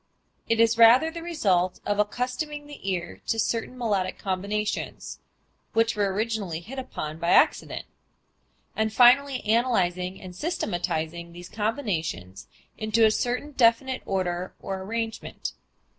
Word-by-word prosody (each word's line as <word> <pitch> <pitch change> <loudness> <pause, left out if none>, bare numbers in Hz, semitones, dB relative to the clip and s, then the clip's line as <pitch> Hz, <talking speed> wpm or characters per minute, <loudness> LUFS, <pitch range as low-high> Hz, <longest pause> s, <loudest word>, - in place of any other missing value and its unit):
It 230 0 +2
is 230 0 +4
rather 245 +8 +7
the 335 0 -7
result 195 - +1
of 205 0 0
accustoming 255 +7 -2
the 290 -9 -7
ear 175 -2 -3
to 225 - +1
certain 230 +3 -1
melodic 200 -6 -1
combinations 200 +2 -3 0.5
(which 225 0 +2
were 200 -2 +1
originally 205 -5 -2
hit 245 +10 -8
upon 155 -11 -6
by 170 0 -1
accident), - - +3 0.9
and 220 +1 0
finally 255 +2 +5
analyzing 190 -6 +1
and 180 -1 -10
systematizing 170 - -3
these 175 +1 -10
combinations 180 - -3 0.3
into 220 +1 +3
a 215 - +5
certain 250 +6 -1
definite 255 0 +3
order 180 -1 -2
or 190 -1 -5
arrangement. 225 +3 -4
215 Hz, 130 wpm, -26 LUFS, 185-245 Hz, 0.9 s, rather